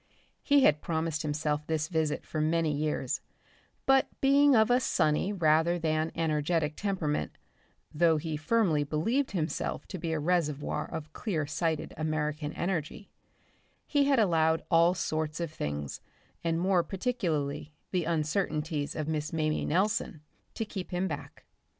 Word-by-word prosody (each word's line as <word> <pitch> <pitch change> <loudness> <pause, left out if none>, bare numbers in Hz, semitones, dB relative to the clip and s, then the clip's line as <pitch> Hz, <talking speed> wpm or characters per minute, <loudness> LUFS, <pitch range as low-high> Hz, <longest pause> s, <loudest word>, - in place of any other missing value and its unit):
He 285 -1 +4
had 150 -7 +4
promised 160 -1 -1
himself 150 0 -1
this 155 -1 0
visit 160 -3 -1
for 155 - -3
many 160 0 +1
years, 150 +1 -1 0.6
but 270 0 +4
being 280 0 +5
of 220 +1 +4
a 245 - +5
sunny 160 -4 +1
rather 165 -2 +3
than 160 -1 0
energetic 155 -1 0
temperament 185 -7 -2 0.6
though 165 0 +4
he 155 0 -3
firmly 155 -1 +2
believed 225 - 0
himself 165 -4 -2
to 185 - -5
be 165 0 -3
a 160 - 0
reservoir 150 -3 0
of 155 -1 -6
clear 165 -9 -2
sighted 160 +1 -2
American 155 -1 -2
energy 175 +2 -3 0.7
he 285 -2 +2
had 275 -1 +3
allowed 165 -6 +3
all 170 +2 +5
sorts 155 -2 -2
of 170 -3 -3
things, 75 - -4 0.4
and 165 -1 0
more 185 0 +3
particularly 165 - -2 0.2
the 180 -3 0
uncertainties 155 -2 -1
of 155 -1 -3
Miss 155 -1 -2
Mamie 155 -1 0
Nelson, 180 -2 0 0.3
to 225 - -2
keep 195 -3 -6
him 180 +1 -1
back. - - -7
160 Hz, 145 wpm, -29 LUFS, 155-185 Hz, 0.7 s, being